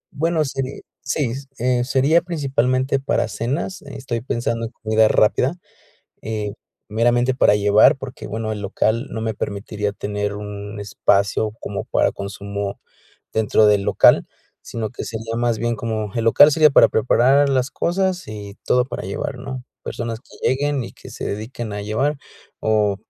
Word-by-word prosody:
Bueno, 160 +1 +1
seri 135 0 -4 0.2
Sí, 130 -3 0 0.2
eh, 125 0 +1
sería 135 +6 +3
principalmente 135 -5 0
para 135 -4 0
cenas, 130 - -3
eh, 140 - -11
estoy 120 -3 -3
pensando 115 -1 -2
en - - -14
comida 110 -1 +2
rápida, 125 +8 +3 0.7
eh, 105 -2 -4 0.3
meramente 120 +3 +2
para 125 -5 +4
llevar, 105 +7 +5
porque, 135 -1 -8
bueno, 110 +1 -3
el 105 -1 -4
local 110 +5 0
no 110 - -4
me 110 0 -1
permitiría 105 0 -3
tener 105 0 -3
un 105 0 -7
espacio 100 +1 +1
como 100 - -4
para - - +2
consumo 100 0 -5 0.5
dentro 110 0 +3
del 105 -1 +4
local, - - +5 0.4
sino 110 -2 -4
que - - -6
sería 115 0 -5
más 120 -2 +1
bien 120 +1 -1
como 110 -2 -3
el 115 -1 -1
local 145 +6 +7
sería 155 0 +6
para - - +6
preparar 130 +5 +3
las 130 -1 +1
cosas 185 0 -1
y 105 -1 -8
todo 125 0 +3
para 120 - -6
llevar, 100 +7 -4
¿no? 130 0 -6 0.2
Personas 115 -1 -4
que - - -4
lleguen 140 +1 0
y - - -8
que - - -13
se - - -6
dediquen 110 +1 -5
a 105 - -4
llevar, 135 +8 0 0.4
o 105 -2 +2
115 Hz, 160 wpm, -21 LUFS, 105-130 Hz, 0.7 s, local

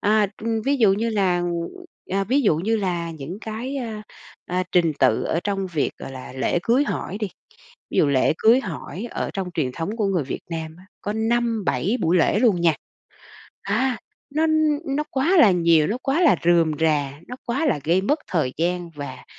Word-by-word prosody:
À, 210 0 +3 0.2
ưm, 225 -1 -1
ví 280 +1 +2
dụ 215 -6 +5
như 225 +3 0
là, 185 -4 +1 0.7
à, 195 +1 +1
ví 265 +7 +2
dụ 165 -8 +3
như 220 +7 0
là 175 -4 -2
những 160 +5 -7
cái, 235 +6 -5
a, 225 -5 -5 0.4
à, 180 +1 -1
trình 170 -3 +3
tự 130 -5 +3
ở 165 - -1
trong 195 -1 -1
việc, 165 -5 -1
gọi 135 - -8
là, 130 -1 -9
lễ 130 +6 0
cưới 250 +5 +3
hỏi 200 -7 -4
đi, 210 -3 -2 0.6
ví - - -1
dụ - - +5
lễ 135 -2 +3
cưới 235 +4 +5
hỏi 190 - -6
ở - - -3
trong 190 -2 -4
truyền 130 -5 -1
thống 170 - -4
của 215 -3 0
người 180 -7 0
Việt - - -5
Nam 160 -1 -5
á, 185 - -16 0.2
có 205 - -3
5-7 225 -1 0
buổi 165 +3 +2
lễ 180 +4 +3
luôn 215 -7 +3
nha. 165 -2 +4 0.9
À, 235 +5 0 0.4
nó 315 +2 +3 0.5
nó 300 - 0
quá 320 +8 +2
là 220 -11 +8
nhiều, 165 -3 +4
nó 230 - -2
quá 285 +7 +1
là 310 - +5
rườm 170 -2 +4
rà, 150 -4 +1 0.2
nó 250 - -6
quá 265 +7 0
là 250 - +1
gây 175 +4 +3
mất 290 +10 +1
thời 155 -8 0
gian 175 +1 -1
và 145 -3 -8
195 Hz, 200 wpm, -23 LUFS, 165-230 Hz, 0.9 s, là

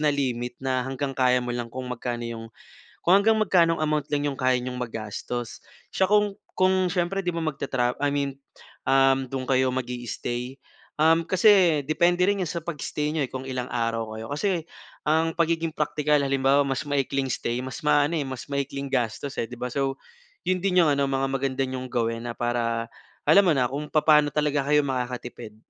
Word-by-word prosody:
na 150 - +2
limit 125 -4 -1
na 130 -1 +1
hanggang 135 +2 -3
kaya 125 -1 +2
mo 120 - -3
lang 120 -1 -3
kung 130 +2 -6
magkano 120 -1 -4
'yong, 115 -1 -6 0.5
kung 180 +3 +5
hanggang 220 +2 +4
magkanong 170 -5 +3
amount 150 -2 +1
lang 145 0 +1
'yong 135 - -4
kaya 130 -1 +2
niyong 125 0 -5
magastos. 115 0 -5 0.2
Siya 190 - +1
kung 205 0 +2 0.2
kung 185 -1 +2
siyempre 190 +1 -1
'di 175 - 0
ba, 165 - -3
magtratra 135 -5 -1
I 145 0 0
mean, 140 -1 -1 0.5
um, 135 0 +4
do'n 130 -1 -4
kayo 130 0 +3
mag-i-stay, 125 0 -4 0.4
um, 165 +1 +5
kasi 185 -5 +5
depende 175 +3 +3
rin 200 -1 +1
sa 170 0 -3
pag-stay 150 -2 -3
niyo, 155 -3 0
eh, 125 - -7
kung 130 0 -5
ilang 125 -1 -3
araw 115 -2 -2
kayo, 110 0 -6
kasi 170 0 -1 0.4
ang 160 +1 +2
pagiging 165 -1 +1
praktikal 150 -1 +1
halimbawa 135 0 +3
mas 135 +2 -2
maikling 135 -1 0
stay, 120 +2 -2
mas 130 - -6
maano, 150 +1 +3
eh, 145 -3 -1
mas 130 -4 -6
maikling 140 0 -3
gastos 125 +2 -2
eh, - - 0
'di 125 - -9
ba? 125 - -2
So, 135 -1 -1 0.5
yun 185 -1 +1
din 180 -2 +4
yung - - +2
ano 140 0 +1
mga 135 0 0
maganda 135 0 -1
niyong 130 0 -5
gawin 115 -1 -1
na - - -3
para 115 -1 -1 0.4
alam 195 +6 +7
mo 170 - +5
na 125 -2 +2
kung 145 +3 -4
papaano 150 -1 +5
talaga 150 -2 +1
kayo 150 0 +5
makakatipid. 125 -4 -4
135 Hz, 185 wpm, -25 LUFS, 125-155 Hz, 0.5 s, alam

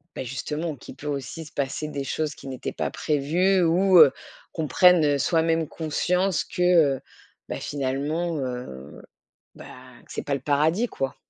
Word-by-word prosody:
Bah - - -4
justement, 150 +5 -4
qui 130 - -12
peut 150 - -10
aussi 140 +3 -4
se 150 - -13
passer 140 +2 -3
des 140 -2 -4
choses 155 +2 -2
qui - - -12
n'étaient 130 -2 -5
pas - - -3
prévues 175 +6 +1
ou, 180 +3 +4
heu, 155 -5 +9 0.4
qu'on 160 -2 -3
prenne, 180 -1 +5
heu, 145 -1 +2
soi-même 165 0 +1
conscience 180 +3 0
que, - - -6
heu, 165 -7 +4 0.5
bah - - -4
finalement, 145 +5 -2
heu, 125 - -6 0.5
bah, - - -12 0.4
c'est - - -5
pas 145 - -2
le 140 - -1
paradis 155 - +1
quoi! 135 -9 -4
150 Hz, 165 wpm, -25 LUFS, 140-170 Hz, 0.5 s, heu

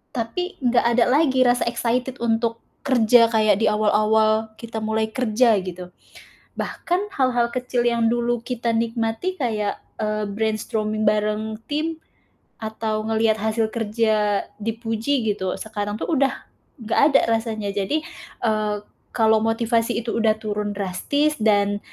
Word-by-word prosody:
tapi 255 +11 -3
nggak 245 -1 +3
ada 235 - +5
lagi 265 -1 +3
rasa 245 0 +3
excited 245 +2 -1
untuk 230 0 0 0.3
kerja 240 -2 +5
kayak 215 -3 +3
di 220 - +3
awal-awal 215 +1 +2
kita 230 -1 -6
mulai 220 0 0
kerja, 240 -1 +3
gitu. 180 -1 -8 0.7
Bahkan 370 +4 -2
hal-hal 245 -3 +2
kecil 250 -1 -1
yang 235 -1 +2
dulu 240 0 0
kita 240 -2 -2
nikmati 230 +9 -1
kayak, 215 -6 -1 0.2
eee, 215 -1 -1
brainstorming 215 0 -2
bareng 215 +1 0
tim, 315 +2 -2 0.6
atau 220 0 -3
ngelihat 220 0 +2
hasil 220 +1 0
kerja 215 -2 +1 0.2
dipuji, 225 +3 -1
gitu, 190 -2 -3
sekarang 205 -1 -4
tuh - - -4
udah 275 -4 +1 0.4
nggak 225 - +1
ada - - +7 0.2
rasanya, 220 -3 -4
jadi, 205 +10 -1 0.4
eee, 215 -2 0 0.4
kalau 220 -2 +4
motivasi 230 +1 +1
itu 235 0 -3
udah 220 -1 +3
turun 210 -1 -3
drastis 205 +11 0
dan, 205 -2 +2
225 Hz, 130 wpm, -22 LUFS, 215-240 Hz, 0.7 s, ada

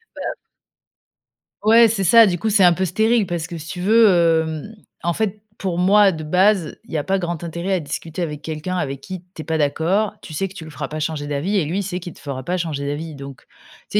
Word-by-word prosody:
Bah - - -8
ap - - -10 1.3
Ouais, 230 +2 +7
c'est 215 -3 -1
ça, 230 +5 +7
du 175 -2 0
coup, 220 +6 -1
c'est 200 -2 +4
un 175 -1 +7
peu 190 +2 -1
stérile 220 +5 +2
parce 170 -2 -3
que 170 - -7
si 160 0 -9
tu 180 - -6
veux, 220 +4 +5 0.3
hem, 160 +7 -6 0.3
en 170 - +1
fait, 215 +1 -2 0.2
pour 185 -3 -3
moi 195 +2 +5
de 155 -3 -6
base, 185 +1 +2
il - - -17
y - - +1
a 145 - -1
pas 195 0 +1
grand 175 -3 -3
intérêt 170 +3 -4
à - - 0
discuter 160 +3 -5
avec 150 -3 -4
quelqu'un 160 +4 -4
avec 140 -6 -2
qui 185 +4 -8
tu - - -6
es - - -10
pas 160 -1 -1
d'accord, 165 +8 +1
tu 155 - -10
sais 195 +6 -2
que - - -14
tu 165 - -9
le - - -10
feras 145 -2 -6
pas 155 - -5
changer 150 -1 -3
d'avis 145 +8 -1
et 195 - +3
lui, 165 +6 -2
il - - -2
sait 180 -1 -4
qu'il 175 - -7
te - - -17
fera 135 -2 -6
pas 180 +7 -1
changer 155 -5 -3
d'avis 150 +2 -4
donc 140 -1 -10 0.5
tu - - +2
175 Hz, 255 wpm, -21 LUFS, 155-195 Hz, 1.3 s, Ouais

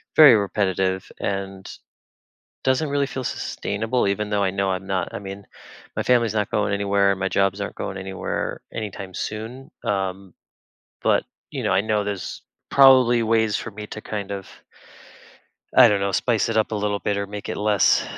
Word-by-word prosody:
very 150 -6 +9
repetitive 95 -2 0
and, 95 -1 -4 1.0
doesn't 130 +4 +2
really 140 0 +1
feel 130 -1 -5
sustainable 110 +1 -2
even 105 +1 -1
though 100 -1 +2
I 95 - +2
know 95 0 0
I'm 95 +1 -3
not 95 -3 -2
I - - -4
mean, 100 0 -8 0.5
my - - 0
family's 120 -3 +3
not 105 -2 0
going 105 -1 +1
anywhere, 100 -1 +2
my 95 0 -2
jobs 100 0 +1
aren't 100 - -4
going 95 - -4
anywhere 95 0 -4
anytime 100 -3 -6
soon, 115 +8 -6 0.2
um, 95 -3 -2 0.7
but, - - +3 0.3
you - - -4
know, - - +1
I 95 - +4
know 105 -1 0
there's 100 -2 -5 0.3
probably 130 -3 +6
ways 110 -1 +2
for 110 - -4
me 105 +1 -8
to 110 - -8
kind 105 -2 -5
of 100 -1 -5 1.3
I 125 - +10
don't 105 -2 +2
know, 100 0 0
spice 115 +2 +1
it 115 - 0
up 110 - +1
a - - -1
little 105 0 0
bit 100 0 -1
or 100 0 -2
make 105 0 -7
it - - -3
less 105 -2 +3
100 Hz, 180 wpm, -23 LUFS, 95-110 Hz, 1.3 s, I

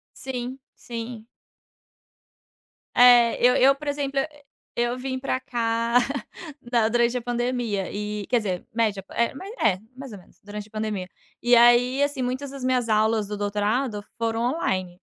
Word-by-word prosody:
Sim, 260 0 -5 0.2
sim. 230 -1 -7 1.7
Eh, 240 -1 +7
eu 250 +1 +5
eu, 275 +2 +5
por 295 +1 -10
exemplo, 280 -1 -1
e 285 - -1 0.5
eu 240 +1 0
vim 260 0 -4
pra 260 -1 -1
cá, 230 -1 0 0.7
na 230 -2 +3
durante 240 +1 +2
a - - -3
pandemia 240 -4 -2
e, 210 0 -4
quer 245 - +2
dizer 190 -5 -3
média, 215 -4 0
é 235 +2 0
ma 375 - -9 0.2
é, 185 -3 +1 0.2
mais 270 -2 -9
ou - - -8
menos, - - -22
durante 205 +1 -7
a - - -26
pandemia 215 -4 -3 0.3
e 240 0 +5
aí 240 +3 +5
assim 285 -2 0
muitas 260 +3 -2
das 275 -2 -8
minhas 250 -3 +1
aulas 215 -1 +2
do 210 0 -5
doutorado 210 +2 -1
foram 230 0 -1
online, 185 - -2
235 Hz, 160 wpm, -24 LUFS, 215-255 Hz, 1.7 s, Eh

